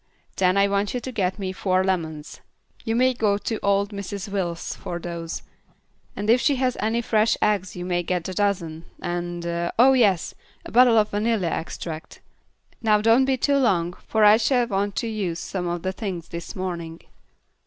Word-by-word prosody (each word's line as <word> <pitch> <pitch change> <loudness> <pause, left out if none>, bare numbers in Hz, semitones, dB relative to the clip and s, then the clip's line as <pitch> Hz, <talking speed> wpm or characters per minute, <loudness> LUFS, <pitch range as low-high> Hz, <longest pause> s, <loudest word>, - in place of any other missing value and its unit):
Then 185 0 +2
I 200 0 +5
want 200 +3 0
you - - 0
to 260 - -6
get 190 -5 -1
me 190 -2 -3
four 185 0 +1
lemons. 160 -5 -3 0.4
You 225 -1 -1
may 255 +2 +3
go 210 -4 +1
to 220 +1 -3
old 200 0 +2
Mrs. 200 0 -5
Wills 180 -4 -3
for 175 - -6
those, 170 -1 -5 0.7
and 205 - -4
if 240 +3 +5
she 285 - +3
has 255 -1 0
any 230 +2 0
fresh 220 0 +2
eggs 195 -4 0
you 180 0 -5
may 175 -1 0
get 175 0 -2
a 185 - -4
dozen, 170 -5 -1
and 175 0 -4 0.3
oh, 260 +3 +7
yes, 205 -9 +2 0.3
a - - -8
bottle 240 0 +6
of 215 -1 +3
vanilla 210 -3 0
extract. 160 -1 -6 0.6
Now 215 -2 +4
don't 230 +5 +4
be 265 -1 +1
too 280 +2 +2
long, 180 -10 +2
for 220 -1 +3
I 210 +1 +8
shall 245 +2 +2
want 200 -2 -1
to 230 - -1
use 200 -7 -2
some 180 -2 -4
of 175 -1 -3
the 185 - -1
things 190 -5 -5
this 170 +5 -7
morning." 170 -3 -5
200 Hz, 185 wpm, -24 LUFS, 175-225 Hz, 0.7 s, I